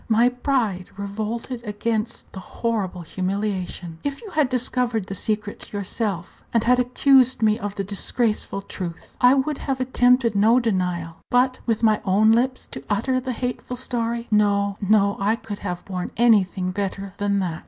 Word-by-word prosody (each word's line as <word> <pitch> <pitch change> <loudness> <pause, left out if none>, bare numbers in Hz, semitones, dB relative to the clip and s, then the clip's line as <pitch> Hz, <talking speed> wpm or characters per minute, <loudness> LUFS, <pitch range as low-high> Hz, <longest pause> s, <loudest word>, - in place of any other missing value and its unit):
My 230 +2 +5
pride 245 -8 -1
revolted 220 +4 -4
against 220 +1 -2
the 190 - -6
horrible 195 -4 -3
humiliation. 185 -2 -3
If 280 -1 -3
you 420 - -9
had 305 -6 +2
discovered 250 -4 0
the 195 - -6
secret 210 +1 -3
yourself, 200 -2 -3
and 230 -2 +2
had 250 +1 +4
accused 255 0 +4
me 215 +1 +3
of 205 -2 -4
the 195 - -2
disgraceful 205 0 -1
truth, 175 -4 -7
I 250 +2 +7
would 275 +2 0
have 270 -2 -2
attempted 250 -2 +3
no 220 +5 +5
denial; 180 -7 -1
but 255 +1 +2
with 225 -1 0
my 215 -2 +4
own 205 +3 +4
lips 255 +3 +1
to - - -6
utter 255 +5 +1
the 255 0 -4
hateful 250 +1 -4
story 235 -2 -2
no, 200 -1 +2
no, 200 0 +3
I 205 +3 +2
could 210 -3 -7
have 180 -3 -5
borne 185 -2 -4
anything 195 -5 +3
better 195 0 -4
than 200 0 +1
that. 170 -4 -3
215 Hz, 165 wpm, -23 LUFS, 195-245 Hz, -, I